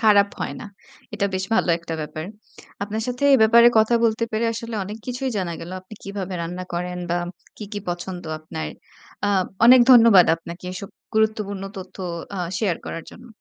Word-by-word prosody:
খারাপ 205 Hz, -3 st, +5 dB
হয় -, -, -3 dB
না। -, -, -7 dB, 0.5 s
এটা 205 Hz, -1 st, 0 dB
বেশ 185 Hz, -, -1 dB
ভালো 220 Hz, -, +2 dB
একটা 165 Hz, -1 st, -6 dB
ব্যাপার। 155 Hz, +1 st, -5 dB, 0.6 s
আপনার 215 Hz, +2 st, -3 dB
সাথে 250 Hz, +3 st, -2 dB
এ -, -, +8 dB
ব্যাপারে 235 Hz, +2 st, +7 dB
কথা 220 Hz, +2 st, +4 dB
বলতে 225 Hz, 0 st, +2 dB
পেরে 220 Hz, +2 st, 0 dB
আসলে 230 Hz, 0 st, -6 dB
অনেক 210 Hz, +3 st, -6 dB
কিছুই 255 Hz, +1 st, -2 dB
জানা 180 Hz, -3 st, -2 dB
গেল, 165 Hz, -, -8 dB
আপনি 185 Hz, +4 st, -13 dB
কিভাবে 195 Hz, -2 st, -5 dB
রান্না 180 Hz, +2 st, -5 dB
করেন 180 Hz, +1 st, -3 dB
বা 175 Hz, -, +2 dB, 0.4 s
কী, 215 Hz, -, -7 dB
কী 205 Hz, -, -2 dB
পছন্দ 175 Hz, +1 st, -4 dB, 0.2 s
আপনার। 80 Hz, -, -6 dB, 0.6 s
আ -, -, +2 dB, 0.4 s
অনেক 250 Hz, +2 st, +9 dB
ধন্যবাদ 230 Hz, -7 st, +8 dB
আপনাকে 170 Hz, +2 st, -10 dB
এসব 190 Hz, +1 st, -7 dB, 0.3 s
গুরুত্বপূর্ণ 215 Hz, -3 st, 0 dB
তথ্য 190 Hz, -1 st, -9 dB, 0.4 s
আ -, -, -3 dB, 0.2 s
শেয়ার 195 Hz, -7 st, 0 dB
করার 165 Hz, -, -5 dB
জন্য। 240 Hz, -, -14 dB
200 Hz, 180 wpm, -23 LUFS, 180-225 Hz, 0.6 s, অনেক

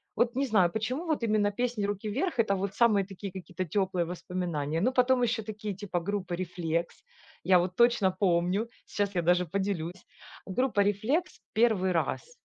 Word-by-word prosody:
вот 240 Hz, +2 st, +1 dB
не 275 Hz, +1 st, +1 dB
знаю, 190 Hz, -8 st, +3 dB
почему 250 Hz, +10 st, -2 dB
вот 310 Hz, -7 st, -1 dB
именно 210 Hz, -2 st, +2 dB
песни 235 Hz, -2 st, -1 dB
"Руки 205 Hz, +1 st, -3 dB
Вверх!"- 285 Hz, -, -1 dB
это 200 Hz, -3 st, +3 dB
вот 195 Hz, 0 st, -2 dB
самые 215 Hz, -5 st, +3 dB
такие 195 Hz, 0 st, -7 dB
какие-то 185 Hz, -1 st, -5 dB
тёплые 185 Hz, 0 st, 0 dB
воспоминания, 170 Hz, -3 st, -3 dB
но 255 Hz, +5 st, +3 dB
потом 255 Hz, 0 st, +3 dB
ещё 225 Hz, -2 st, 0 dB
такие 215 Hz, -1 st, -5 dB
типа 185 Hz, -2 st, -3 dB
группы 185 Hz, -1 st, -3 dB
"Рефлекс". 170 Hz, -2 st, -3 dB, 0.4 s
Я 185 Hz, -1 st, +5 dB
вот 180 Hz, +1 st, 0 dB
точно 235 Hz, -5 st, +3 dB
помню. 185 Hz, +3 st, +2 dB, 0.2 s
Сейчас 200 Hz, -1 st, -2 dB
я 175 Hz, -, +2 dB
даже 180 Hz, +1 st, +3 dB
поделюсь. 185 Hz, -1 st, -3 dB, 0.4 s
Группа 210 Hz, +1 st, +1 dB
"Рефлекс" 220 Hz, -, 0 dB
"B 220 Hz, -, +2 dB
первый 190 Hz, -3 st, 0 dB
раз". 180 Hz, -, -2 dB
200 Hz, 175 wpm, -29 LUFS, 180-225 Hz, 0.4 s, Я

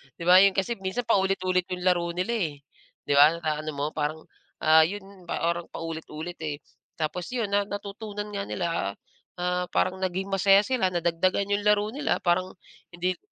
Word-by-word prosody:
'di 170 Hz, -, -8 dB
ba? 180 Hz, +2 st, +8 dB
'Yon 195 Hz, 0 st, +5 dB
kasi 195 Hz, +3 st, -1 dB
minsan 195 Hz, +6 st, -2 dB
paulit-ulit 190 Hz, -4 st, +1 dB
yung 180 Hz, -, -5 dB
laro 180 Hz, -2 st, +2 dB
nila, 185 Hz, +6 st, -1 dB
eh, 180 Hz, -10 st, -1 dB, 0.5 s
'di -, -, -4 dB
ba 150 Hz, +3 st, +7 dB
naano 155 Hz, -2 st, -3 dB
mo, 140 Hz, +1 st, -1 dB
parang, 155 Hz, +1 st, -3 dB, 0.4 s
ah, 160 Hz, 0 st, +7 dB
'yon 195 Hz, -2 st, -9 dB
parang 170 Hz, 0 st, -1 dB
paulit-ulit, 165 Hz, +1 st, -7 dB
eh. 150 Hz, -2 st, -3 dB, 0.4 s
Tapos 160 Hz, +2 st, -3 dB
'yon 225 Hz, -5 st, -1 dB
na 200 Hz, 0 st, +2 dB
natutunan 205 Hz, +1 st, -6 dB
nga 200 Hz, -1 st, -4 dB
nila, 175 Hz, -2 st, -2 dB, 0.7 s
ah, 180 Hz, 0 st, -1 dB
parang 185 Hz, 0 st, 0 dB
naging 190 Hz, +1 st, -2 dB
masaya 195 Hz, +1 st, +5 dB
sila, 245 Hz, -5 st, +1 dB
nadagdagan 175 Hz, +3 st, 0 dB
yung 205 Hz, 0 st, 0 dB
laro 210 Hz, 0 st, +3 dB
nila, 285 Hz, +5 st, 0 dB
parang 185 Hz, +1 st, +1 dB, 0.4 s
hindi 180 Hz, +1 st, -1 dB
185 Hz, 165 wpm, -26 LUFS, 170-200 Hz, 0.7 s, ba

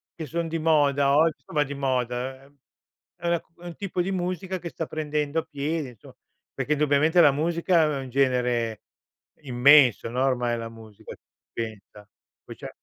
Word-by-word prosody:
che 160 Hz, -, -6 dB
son 170 Hz, +3 st, -2 dB
di 165 Hz, +1 st, -3 dB
moda 145 Hz, -3 st, +3 dB
ogg 160 Hz, 0 st, +4 dB
somma 150 Hz, -2 st, -1 dB
di 145 Hz, 0 st, -7 dB
moda, 130 Hz, -1 st, -2 dB
ehm, 140 Hz, 0 st, -24 dB, 0.6 s
è 170 Hz, -, -3 dB
una 170 Hz, 0 st, +2 dB
cu -, -, -38 dB
è -, -, -12 dB
un 170 Hz, -, -8 dB
tipo 190 Hz, -3 st, -3 dB
di 190 Hz, +2 st, -2 dB
musica 185 Hz, 0 st, -3 dB
che 170 Hz, -, -6 dB
sta 165 Hz, -, -5 dB
prendendo 150 Hz, 0 st, -2 dB
piede, 150 Hz, 0 st, -3 dB
insomma, 115 Hz, -5 st, -16 dB, 0.4 s
perché 150 Hz, -, -4 dB
indubbiamente 150 Hz, +3 st, +3 dB
la 145 Hz, -, +7 dB
musica 170 Hz, +2 st, +2 dB
è 150 Hz, -3 st, 0 dB
un 130 Hz, -1 st, -7 dB
genere 125 Hz, -4 st, 0 dB, 0.6 s
immenso, 130 Hz, -3 st, +5 dB
no, 125 Hz, +2 st, -1 dB
ormai 120 Hz, -3 st, 0 dB
la 115 Hz, 0 st, -6 dB
musica, 110 Hz, -1 st, -12 dB, 0.4 s
pensa. 105 Hz, -2 st, -7 dB, 0.4 s
Poi -, -, -10 dB
c'è -, -, -8 dB
145 Hz, 175 wpm, -25 LUFS, 125-165 Hz, 0.6 s, la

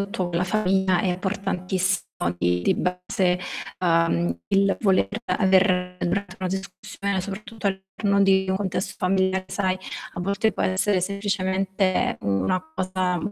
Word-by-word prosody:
tutto 185 Hz, -3 st, -2 dB
con 170 Hz, -, -3 dB
la 180 Hz, -, +2 dB
famiglia 190 Hz, -2 st, +2 dB
è 200 Hz, -, 0 dB
importantissimo 185 Hz, 0 st, -1 dB, 0.3 s
di 90 Hz, 0 st, +1 dB
di -, -, +3 dB
base, 180 Hz, 0 st, 0 dB, 0.4 s
ehm, 165 Hz, -, +2 dB, 0.2 s
il 195 Hz, 0 st, +4 dB
voler 195 Hz, -4 st, +3 dB, 0.2 s
aver 185 Hz, -2 st, +2 dB
durante 185 Hz, +1 st, -2 dB
una 185 Hz, -, -2 dB
discussione, 195 Hz, +1 st, -3 dB
soprattutto 210 Hz, +3 st, -6 dB
all'interno 200 Hz, +1 st, 0 dB
di 190 Hz, -1 st, +4 dB
un 190 Hz, -, +2 dB
contesto 190 Hz, -1 st, -2 dB
familiare, 190 Hz, 0 st, +1 dB
sai, 185 Hz, -2 st, 0 dB, 0.4 s
a 175 Hz, -, -4 dB
volte 200 Hz, +4 st, +1 dB
può -, -, -2 dB
essere 190 Hz, +1 st, +2 dB
semplicemente 195 Hz, -1 st, 0 dB
una 100 Hz, -, 0 dB
cosa 185 Hz, -1 st, 0 dB
190 Hz, 135 wpm, -24 LUFS, 180-195 Hz, 0.4 s, il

